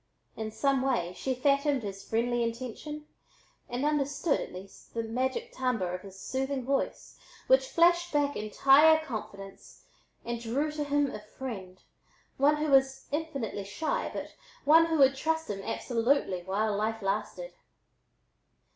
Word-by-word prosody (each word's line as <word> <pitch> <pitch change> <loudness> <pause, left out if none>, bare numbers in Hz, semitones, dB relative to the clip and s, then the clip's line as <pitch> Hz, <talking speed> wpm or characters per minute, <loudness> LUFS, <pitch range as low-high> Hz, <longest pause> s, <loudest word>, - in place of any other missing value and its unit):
In 220 -1 -4
some 275 +4 +1
way 240 -10 0
she 260 -1 -2
fathomed 280 0 +2
his 195 -1 -6
friendly 240 +2 0
intention 255 +6 -4 0.6
and 245 +4 -2
understood, 290 +1 +1
at - - -6
least, 190 +5 -12
the 230 - -1
magic 260 - -2
timbre 225 - -1
of 180 - -4
his 195 -1 -12
soothing 265 +3 -2
voice 275 +1 -2 0.3
which - - +4
flashed 345 -1 +3
back 290 -1 +1
entire 275 +9 +5
confidence 200 -6 -8 0.4
and 235 0 -3
drew 270 +7 -1
to 300 -1 -3
him 285 -1 +1
a - - -6
friend, 210 -5 -8 0.5
one 285 +2 +4
who 300 -1 -1
was 270 0 +3
infinitely 280 -9 -3
shy, 205 +11 -2
but - - -6 0.3
one 325 +3 +7
who 325 -1 0
would 270 -2 +6
trust 320 0 -1
him 195 -1 -5
absolutely 230 -3 0
while 200 +4 -1
life 220 +1 -2
lasted. 215 - -3
260 Hz, 145 wpm, -29 LUFS, 215-295 Hz, 0.6 s, one